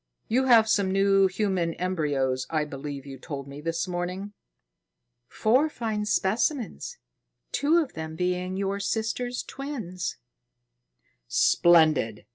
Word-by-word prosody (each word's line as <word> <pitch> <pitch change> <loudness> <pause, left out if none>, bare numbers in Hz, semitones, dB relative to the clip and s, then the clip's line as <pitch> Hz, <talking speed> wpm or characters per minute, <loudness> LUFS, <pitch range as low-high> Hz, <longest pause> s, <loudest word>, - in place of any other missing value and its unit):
You 255 +4 +2
have 230 -4 +6
some 200 -3 +2
new 195 0 +4
human 185 -4 -1
embryos, 145 -8 -1
I 155 -2 0
believe 140 -1 -7
you 135 -1 -9
told 140 -4 -6
me 140 +1 -9
this 165 +2 -2
morning." 180 +3 -4 0.9
"Four 255 +8 +2
fine 220 -6 -3
specimens, 240 - -1 0.5
two 300 +4 +2
of 315 -6 0
them 160 0 -6
being 180 +2 -1
your 200 0 -1
sister's 225 +4 -2
twins." 230 -11 -5 1.1
"Splendid! 155 - +3
185 Hz, 115 wpm, -26 LUFS, 160-220 Hz, 1.1 s, have